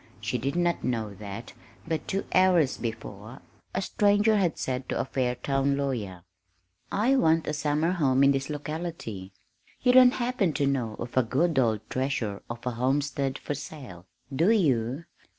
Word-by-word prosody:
She 115 +3 -2
did 135 +6 -2
not 175 -1 +1
know 110 -4 -2
that 100 +3 -8 0.3
but 160 -1 -2
two 195 - -2
hours 180 -7 +4
before, 110 0 -6 0.4
a 190 - 0
stranger 205 +2 +3
had 180 -6 +1
said 130 0 -3
to - - -1
a - - 0
Fairtown 135 +2 0
lawyer: 110 -11 -3 0.7
"I 240 +7 +2
want 165 -9 +3
a 150 - -2
summer 150 +2 0
home 140 -7 +2
in 140 - +6
this 135 0 -1
locality. 150 - -5 0.5
You 250 - +5
don't 255 0 +7
happen 240 -8 0
to 145 - 0
know 125 -6 -1
of 120 0 -7
a 130 - +5
good 140 +6 +1
old 110 -3 0
treasure 125 -6 -2
of 120 +1 -7
a 125 - 0
homestead 135 +2 -1
for - - -4
sale, 135 - -9 0.3
do 165 +8 +3
you?" 140 - +1
140 Hz, 165 wpm, -27 LUFS, 120-165 Hz, 0.7 s, don't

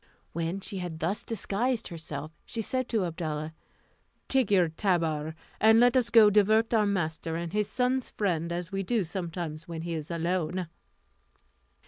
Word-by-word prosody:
When 170 +4 -2
she 195 0 -6
had 175 -3 -5
thus 175 +6 -1
disguised 230 +3 -1
herself, 155 -3 -6
she 225 -2 -3
said 255 +2 -2
to 215 -5 +1
Abdalla, 160 -2 -3 0.7
"Take 265 -5 +2
your 185 -5 +4
tabour, 160 -3 0 0.2
and 220 +1 +6
let 245 +2 +5
us 245 -3 +3
go 225 -2 +8
and 210 - +4
divert 215 +3 +4
our 215 -2 +4
master 165 -4 -1
and 170 0 -4
his 210 0 +1
son's 250 +2 0
friend, 170 -5 -1
as 175 0 -3
we 195 0 -1
do 210 +2 +1
sometimes 165 -2 -5
when 165 -1 -5
he 170 0 -3
is 155 -2 -4
alone." 170 0 -1
180 Hz, 165 wpm, -28 LUFS, 165-215 Hz, 0.7 s, go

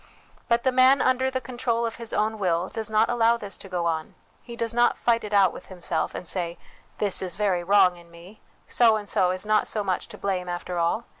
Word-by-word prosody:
But 235 0 +2
the 260 - +2
man 260 +2 +5
under 260 +1 +2
the 260 0 -2
control 240 -1 -2
of 230 - -4
his 230 -1 -4
own 215 +1 -1
will 175 -1 0
does 220 -1 -4
not 215 +1 +3
allow 235 -1 +2
this 205 -4 -7
to 195 - -11
go 175 -2 -2
on: 160 -2 -2 0.3
he 235 - -10
does 230 -1 -2
not 240 0 +3
fight 230 -1 +1
it 210 - -6
out 195 -3 +4
with - - -11
himself, 175 -3 -3
and 180 - -7
say, 175 -2 -2 0.2
' - - -32
This 205 -3 -1
is 185 -2 -3
very 195 -4 0
wrong 190 -1 +4
in 170 0 -17
me. 170 +5 -15 0.3
So 230 -2 +4
and 210 -1 -5
so 185 -2 +2
is 185 +2 -3
not 215 0 +2
so 210 - -2
much 185 -2 -2
to - - -10
blame, 185 -2 -2
after 175 0 -4
all. 170 +8 0
205 Hz, 240 wpm, -25 LUFS, 180-235 Hz, 0.3 s, man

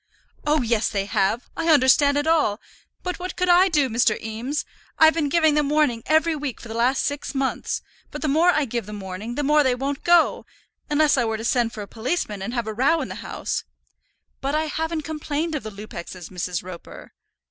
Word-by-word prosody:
"Oh, 300 -2 +3
yes, 230 -2 +1
they 200 -2 -1
have; 205 +3 0
I 330 - -2
understand 285 0 +5
it 290 - 0
all. 310 -10 +2 0.4
But 360 0 -3
what 365 +1 -5
could 365 0 0
I 360 +2 +6
do, 300 -5 +2
Mr. 225 -2 +2
Eames? 230 +7 -4 0.3
I've 315 0 +7
been 310 -3 0
giving 315 0 +3
them 295 -1 +1
warning 295 -6 +2
every 315 +1 +3
week 285 -4 -4
for - - -10
the - - -5
last 245 +4 +1
six 285 0 -3
months; 270 -1 -2 0.3
but - - -7
the - - +1
more 320 +5 +4
I 305 -4 +3
give 235 -4 -4
them 210 -1 -7
warning, 195 +5 -6
the 290 - -1
more 300 +2 +4
they 260 -3 +2
won't 275 +2 -3
go. 345 -1 +3 0.4
Unless 300 -1 +3
I 240 - +2
were 225 -1 -1
to 225 - -6
send 240 -2 +1
for 210 - -6
a - - -10
policeman, 220 - -3
and 200 +4 -4
have 235 -2 -1
a 220 - -4
row 280 +9 +2
in - - -5
the - - -5
house - - -3 0.4
" - - -47
"But 275 +2 -1
I 310 - +1
haven't 320 +1 -2
complained 310 +1 -3
of 300 - -2
the 215 - -6
Lupexes, 185 -4 -9
Mrs. 180 -1 -3
Roper." 180 -2 -11
275 Hz, 220 wpm, -23 LUFS, 220-310 Hz, 0.4 s, I've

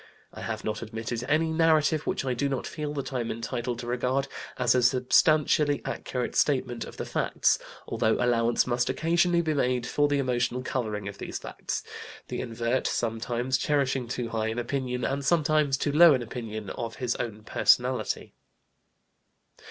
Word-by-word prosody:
I - - -9
have - - -4
not 110 0 -3
admitted 115 +1 -4
any 160 +3 +2
narrative 160 -1 +3
which - - -1
I 130 - 0
do 140 +3 -1
not 135 -2 -2
feel 150 -2 -4
that 140 -1 -4
I 130 - 0
am 120 -1 -2
entitled 120 +1 -3
to 120 - -6
regard 125 +3 0 0.3
as 125 -2 +3
a 125 - +3
substantially 145 +4 +3
accurate 125 -1 -3
statement 125 -4 +1
of - - -11
the - - -4
facts, - - +1 0.3
although 110 - +1
allowance 120 -1 +2
must 125 0 0
occasionally 170 +5 +2
be 160 -1 0
made 125 -3 +1
for 145 +3 +2
the 145 0 +1
emotional 125 -1 0
coloring 110 -6 -3
of 100 0 -7
these - - -5
facts, - - -5 0.5
the - - -3
invert 120 +1 -1
sometimes 120 +3 -1
cherishing 135 -4 0
too 120 -1 -3
high 110 -1 -1
an 110 +1 -3
opinion, 125 0 -2
and 140 +1 -1
sometimes 155 -3 +2
too 145 - -1
low 160 0 +8
an 125 - -2
opinion, 110 -3 -6
of 115 -1 -5
his 125 -2 -1
own 110 -3 -5
personality. - - +1
125 Hz, 170 wpm, -27 LUFS, 120-145 Hz, 0.5 s, low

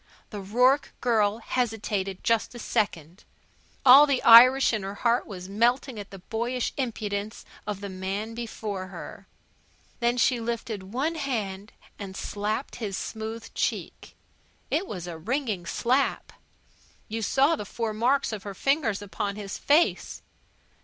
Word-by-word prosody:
The 205 -2 -6
Rourke 250 +8 +2
girl 220 -3 +2
hesitated 220 -5 -2
just 230 +1 +1
a - - -6
second. 180 -6 -2 0.6
All 270 +3 +9
the 275 -3 0
Irish 250 +4 +8
heart 220 - 0
in - - -8
her 235 +3 +2
was 185 -3 -8
melting 235 +4 +1
at 200 - -8
the 195 - -10
boyish 235 +6 -3
impudence 215 -4 -4 0.2
of 205 -2 -4
the 200 - -4
man 195 +4 -4
before 215 -5 -5
her. 185 -3 -10 0.7
Then 240 0 +1
she 245 0 +3
lifted 225 -4 -4
one 275 +8 -1
hand 220 -9 -4 0.3
and 195 -2 -7
slapped 210 +6 -3
his 205 -5 -4
smooth 220 +1 -6
cheek. - - -3 0.6
It 360 +5 0
was 180 -4 -6
a 170 -2 -7
ringing 215 - -2
slap. 255 +8 0 0.7
You 225 +1 -4
saw 275 +8 +3
the 245 - -5
four 220 +2 -3
marks 245 +6 +1
of 210 - -5
her 200 0 -7
fingers 250 - 0
upon 200 0 -3
his 205 -1 -6
face. 305 +4 +1
220 Hz, 145 wpm, -26 LUFS, 200-250 Hz, 0.7 s, All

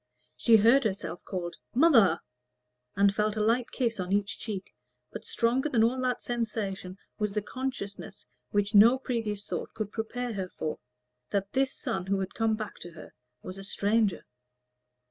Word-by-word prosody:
She 230 - +5
heard 235 +6 +5
herself 190 -5 -3
called 175 -3 -5 0.2
"Mother!" 230 - +5 0.7
and 200 0 +4
felt 210 +1 0
a - - -2
light 230 +3 +2
kiss 235 -5 -1
on 180 0 -3
each 200 0 0
cheek; 200 -4 -5 0.4
but - - -8
stronger 250 +5 +1
than 230 -5 +3
all 255 +3 +2
that 250 -1 -1
sensation 210 -6 -3 0.2
was 210 -2 -1
the 210 - 0
consciousness 250 -6 -5 0.2
which 205 +1 0
no 225 +5 +8
previous 220 -6 -3
thought - - -5
could 215 -2 -3
prepare 240 +2 -3
her 190 -3 -3
for, 155 - -4 0.5
that 200 -1 -2
this 265 0 +2
son 190 -1 -3
who 195 0 +1
had 190 -1 -3
come 225 -1 +1
back 215 -1 -6
to 175 0 -9
her 155 - -12 0.3
was 185 +1 -7
a - - -7
stranger. 205 +1 +1
210 Hz, 165 wpm, -29 LUFS, 195-235 Hz, 0.7 s, no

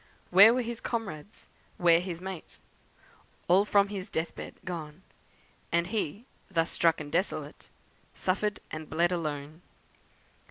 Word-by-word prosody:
Where 200 +5 +9
were 250 +1 +1
his 235 0 -4
comrades? 205 -6 -5 0.3
where 170 -4 +5
his 175 -2 -5
mate? 185 -2 -8 0.9
All 190 +4 +5
from 200 -1 +3
his 195 -2 -5
death 160 +1 -2
bed - - -8
gone! 165 -1 -6 0.7
And 170 0 +2
he, 205 +1 -3 0.2
thus 165 -3 0
struck 165 -1 +3
and 145 -1 -7
desolate, 180 +5 -2 0.5
Suffered 205 +2 0
and 155 0 -6
bled 170 +2 +2
alone. 155 -2 -3
175 Hz, 130 wpm, -29 LUFS, 165-200 Hz, 0.9 s, Where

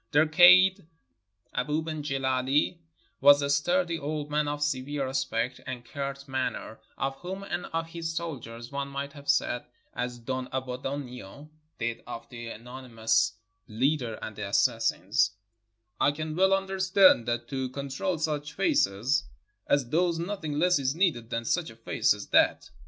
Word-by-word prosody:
Their 150 +1 +4
kaid, 180 +3 +7 0.7
Abou 150 +5 -1
ben 155 -1 -4
Gileh, 135 +2 0 0.4
was 145 +2 +7
a 140 - 0
sturdy 170 +3 +1
old 150 0 -4
man 150 0 +1
of 145 0 -2
severe 140 -1 -1
aspect 130 -2 -2
and 125 -2 -6
curt 140 +1 -5
manner, 130 -4 -3 0.2
of 135 0 -2
whom, 190 +5 -6
and 180 -2 -4
of 165 0 -2
his 165 -1 -4
soldiers, 120 -8 -6
one 140 0 -3
might 140 0 -5
have 145 -1 -10
said 120 - +2 0.3
as 125 0 -3
Don 130 +2 -4
Abbondio 130 0 -6 0.3
did 115 0 -3
of - - -7
the 120 -2 -8
anonymous 115 -2 -1 0.3
leader 120 0 0
and 110 - -6
the 105 -1 -4
assassins: 100 - +2 0.7
"I 145 - +4
can 155 +1 -5
well 190 +2 +4
understand 190 - +4
that 120 0 -1
to 130 -1 -2
con 140 +2 -6
trol 160 +5 -2
such 150 -1 -2
faces 135 - +1 0.4
as 140 -3 +2
these 170 +4 +1
nothing 170 -4 -3
less 180 0 +3
is 135 +1 0
needed 160 - +1
than 115 -1 -3
such 175 +6 0
a 115 - -12
face 115 - +1
as - - -9
that." - - +3
140 Hz, 155 wpm, -28 LUFS, 125-160 Hz, 0.7 s, kaid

